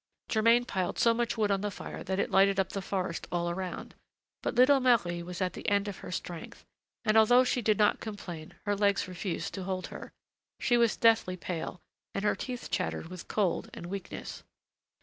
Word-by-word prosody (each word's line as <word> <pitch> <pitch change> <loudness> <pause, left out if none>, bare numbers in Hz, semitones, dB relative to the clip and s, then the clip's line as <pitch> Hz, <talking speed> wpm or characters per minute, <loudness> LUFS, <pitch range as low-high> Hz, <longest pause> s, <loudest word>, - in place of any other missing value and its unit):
Germain 230 +2 +4
piled 185 -7 -2
so 230 - +4
much 235 0 -1
wood 210 -2 +2
on 195 -1 +1
the 210 - -1
fire 195 - -7
that 190 0 -2
it - - 0
lighted 195 0 +4
up 190 - +1
the 195 - -4
forest 185 -3 -3
all 175 0 0
around; 180 0 -5 0.5
but - - -2
little 270 +3 +6
Marie 225 -10 +2
was 175 +1 -6
at 180 - -1
the - - -3
end 200 0 +2
of 200 - -5
her - - -8
strength, 175 -2 -6 0.4
and, 215 0 +3
although 245 +3 +7
she 250 -1 0
did 215 -2 +2
not 210 -1 +3
complain, 175 -7 -7
her 205 -1 +1
legs 200 -1 +2
refused 180 0 -4
to 190 - -4
hold 185 0 -3
her. - - -8 0.5
She 240 - +2
was 235 -2 +3
deathly 225 -5 +4
pale, 175 0 -5 0.3
and 195 - -1
her 210 - +3
teeth 250 -2 -6
chattered 180 -2 -2
with 180 -1 -9
cold 200 -5 0
and 170 - -7
weakness. 195 -2 -6
200 Hz, 200 wpm, -30 LUFS, 180-225 Hz, 0.5 s, although